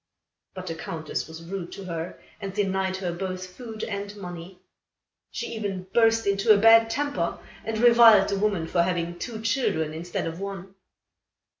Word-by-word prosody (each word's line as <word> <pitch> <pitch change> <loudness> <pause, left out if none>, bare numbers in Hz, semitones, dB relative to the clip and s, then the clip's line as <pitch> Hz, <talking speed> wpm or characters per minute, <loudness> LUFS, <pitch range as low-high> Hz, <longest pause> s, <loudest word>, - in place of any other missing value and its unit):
But 185 -1 -6
the 165 - -3
Countess 160 -1 -4
was 160 +1 -10
rude 175 0 -6
to 195 - -8
her 165 -1 -5 0.2
and 195 -2 -5
denied 190 -1 0
her 185 -2 -2
both 185 +1 -4
food 220 +3 -8
and 205 0 -5
money. 180 -1 -8 0.7
She - - -5
even 200 -4 -3
burst 225 -1 +4
into 200 +2 +3
a 210 - +8
bad 225 +2 +7
temper, 230 -9 -1 0.3
and 225 0 -3
reviled 230 -3 +7
the 200 -1 -1
woman 200 -5 +1
for 170 +1 +1
having 175 -1 -1
two 220 +2 -5
children, 160 - 0
instead 170 +2 -4
of 165 +1 -5
one. 195 -1 -6
195 Hz, 165 wpm, -26 LUFS, 175-220 Hz, 0.7 s, a